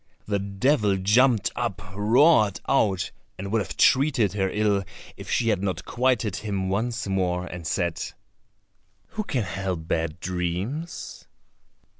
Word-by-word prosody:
The 100 -1 0
devil 100 +1 +1
jumped 110 +4 +3
up, - - -2
roared 110 - +4
out, 95 -9 +1 0.3
and 95 +1 -5
would 110 -1 +2
have - - -6
treated 130 -7 +3
her 95 -2 0
ill 105 -1 +1 0.3
if - - -10
she 115 -2 +1
had 100 -4 +1
not 95 -2 -2
quieted 120 -5 +1
him 100 -3 -2
once 115 +4 -1
more 90 -2 0
and 90 -3 -7
said, 85 -2 -1 1.1
"Who 215 - -3
can 130 - -1
help 95 -4 -4
bad 80 0 -1
dreams?" 95 - -4
100 Hz, 135 wpm, -25 LUFS, 95-120 Hz, 1.1 s, roared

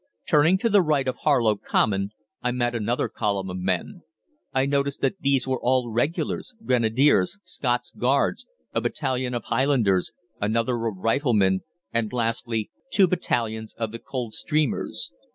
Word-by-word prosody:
"Turning 155 +4 +5
to 215 - 0
the 205 -3 +5
right 150 -5 +1
of 130 - -1
Harlow 120 -8 +3
Common, 100 -1 +1 0.3
I 125 - 0
met 120 -1 0
another 120 +1 0
column 100 -2 -2
of 90 - -5
men. 90 - -2 0.5
I 130 0 +2
noticed 140 0 0
that 195 - 0
these 135 -3 +1
were 130 -1 0
all 125 -1 +1
Regulars, 160 - -1
Grenadiers, 130 - +3
Scots 120 -2 -2
Guards, 135 +3 +1 0.3
a - - +1
battalion 125 -1 -1
of 120 - -3
Highlanders, 115 -8 +2 0.3
another 115 +2 0
of 105 -4 -4
Riflemen, 105 -4 +2 0.3
and, 115 -2 0
lastly, 115 -2 -1 0.2
two 195 -2 +5
battalions 115 -10 -1
of 115 -2 -3
the 115 - -7
Coldstreamers. 135 +5 -2
120 Hz, 145 wpm, -25 LUFS, 110-140 Hz, 0.5 s, Turning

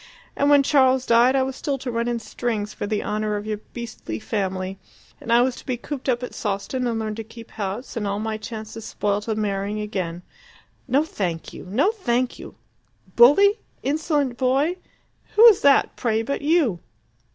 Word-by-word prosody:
And 285 - +2
when 285 -1 +6
Charles 265 -2 +3
died 240 +3 +5
I 265 - +3
was 265 0 -3
still 280 0 -2
to 260 -1 -5
run 235 0 -1
in 240 -1 0
strings 220 -2 -3
for - - -4
the 210 0 -1
honour 210 0 -1
of 205 0 -4
your 215 -1 -3
beastly 230 - -6
family, 190 - -3 0.4
and 230 - -5
I 240 +1 +6
was 255 -1 0
to - - -11
be 255 -2 -1
cooped 270 +2 -5
up 245 0 0
at 250 - -6
Sawston 210 +5 -2
and 230 -1 -1
learn 220 -1 -3
to 225 +1 -6
keep 225 +1 -13
house, 210 +6 -5
and 215 -3 -2
all 200 0 -1
my 220 +1 -3
chances 220 0 -7
spoilt 205 +1 -2
of 220 -1 -1
marrying 205 0 -2
again. 180 -5 -4 0.6
No, 270 +4 +3
thank 180 - -4
you! - - -9
No, 260 - +2
thank 255 - -1
you! - - -10 0.6
'Bully?' 395 - +6 0.2
'Insolent 290 -3 0
boy?' 275 +7 +1 0.6
Who's 445 -1 +8
that, 280 0 +4
pray, 225 -2 0
but 280 +5 -3
you? 290 - +2
235 Hz, 185 wpm, -23 LUFS, 210-265 Hz, 0.6 s, Who's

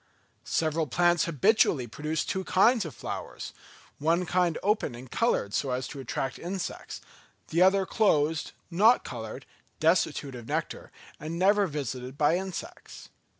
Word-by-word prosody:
Several 160 0 0
plants 175 +4 +3
habitually 170 - +3
produce 150 +7 -3
two 190 - -2
kinds 215 +4 +3
of 160 - -7
flowers; - - -6 0.5
one 165 +4 +2
kind 175 -2 +1
open 205 - +1
and 125 +1 -11
coloured 165 - +1
so 140 - 0
as 125 0 -2
to 140 - -8
attract 135 +1 -3
insects; 185 +2 -5 0.5
the 170 - +1
other 190 +1 +5
closed, 160 -7 +1 0.2
not 215 +8 +5
coloured, 120 +2 -7 0.3
destitute 155 -4 +1
of 120 -2 -9
nectar, - - -3 0.3
and 160 +3 -5
never 200 +2 +4
visited 130 -3 -5
by 150 +3 +3
insects. 190 - -7
165 Hz, 140 wpm, -28 LUFS, 135-190 Hz, 0.5 s, other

